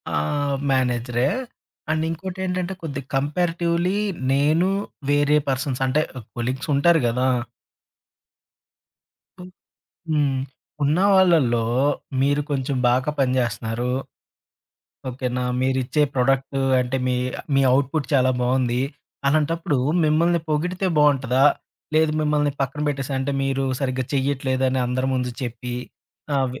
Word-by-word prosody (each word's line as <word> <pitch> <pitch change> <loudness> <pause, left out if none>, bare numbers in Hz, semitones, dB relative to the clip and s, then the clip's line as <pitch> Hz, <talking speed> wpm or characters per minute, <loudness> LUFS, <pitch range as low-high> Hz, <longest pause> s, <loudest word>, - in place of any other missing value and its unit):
ఆహ్, 140 - 0 0.2
మేనేజరే 125 0 +1 0.6
అండ్ 155 0 0
ఇంకోటి 185 +3 -5
ఏంటంటే, 180 0 -2
కొద్దిగా 140 -4 -5
కంపారేటివ్‌లీ 170 +5 0 0.3
నేను 155 +6 +3 0.4
వేరే 145 +1 +3
పర్సన్స్ 135 -1 -2
అంటే 150 +4 +2 0.3
కొలీగ్స్ 130 +5 -3
ఉంటారు 165 +3 +4
గదా. 125 +3 +1 2.1
ఓహ్, 180 - -10 0.6
హ్మ్. 145 -3 +1 0.5
ఉన్నవాళ్లలో 165 - +4 0.6
మీరు 145 +2 +2
కొంచెం 135 0 -1
బాగా 130 +4 +2
పనిచేస్తున్నారు. 120 -2 0 1.2
ఓకెనా! 125 0 -3 0.2
మీరిచ్చే 130 +2 +1
ప్రొడక్ట్ 135 +1 +1 0.2
అంటే 125 +1 -1
మీ, 125 -1 +1 0.4
మీ 135 - +4
అవుట్‌పుట్ 140 +1 +1
చాలా 130 -2 +4
బావుంది, 125 0 +1 0.5
అలాంటప్పుడు 155 0 +1 0.3
మిమ్మల్ని 165 +2 +3
పొగిడితే 180 +5 0
బావుంటదా? 135 -2 +3 0.5
లేదు 160 -1 +3
మిమ్మల్ని 150 -1 +1
పక్కన 135 +2 -2
పెట్టేసి, 135 -1 -3
అంటే 135 +1 -1
మీరు 135 0 0 0.2
సరిగ్గా 130 -1 -1
చెయ్యట్లేదని 130 -1 0
అందరి 130 +1 -1
ముందు 125 -1 -1
చెప్పి, 120 0 -5 0.6
ఆహ్, 135 -1 +2
వి - - -8
135 Hz, 105 wpm, -23 LUFS, 130-150 Hz, 2.1 s, ఉంటారు